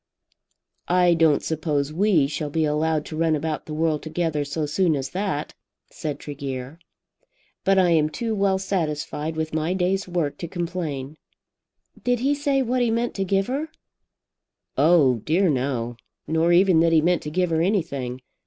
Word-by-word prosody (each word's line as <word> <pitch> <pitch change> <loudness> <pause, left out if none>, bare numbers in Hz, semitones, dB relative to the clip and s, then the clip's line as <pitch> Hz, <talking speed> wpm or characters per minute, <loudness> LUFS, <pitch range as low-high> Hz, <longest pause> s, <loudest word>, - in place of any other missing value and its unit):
"I 180 -1 +4
don't 160 -3 +3
suppose 150 -2 -1
we 180 -4 +3
shall 150 +1 -3
be 160 +2 0
allowed 155 +1 0
to 155 - -7
run 160 0 +2
about 155 +1 -3
the 155 - -5
world 155 -1 0
together 160 -2 -1
so 145 +2 -3
soon 160 +2 +1
as 135 -1 -4
that," 185 -6 -2 0.4
said 150 -2 -4
Tregear, 140 0 -6 0.8
"but 195 0 +3
I 180 -2 +4
am 155 -2 +3
too 230 +6 -3
well 195 -2 +2
satisfied 160 -4 -2
with 160 0 -3
my 160 +3 0
day's 190 +1 0
work 170 -5 -2
to 170 - -4
complain." 165 -5 -4 0.9
"Did 245 -1 +1
he 275 +3 +2
say 280 -2 +1
what 250 +1 0
he 240 - +2
meant 235 +1 0
to 195 - -2
give 195 +1 +1
her?" 280 +7 -3 1.1
"Oh 150 -7 +4
dear 165 - +1
no; 125 -3 -2 0.3
nor 160 +2 +2
even 180 -1 +5
that 165 0 +3
he 160 - +6
meant 175 +2 +2
to 150 - -5
give 180 +2 0
her 160 0 +2
anything. 140 - -1
160 Hz, 170 wpm, -24 LUFS, 150-190 Hz, 1.1 s, he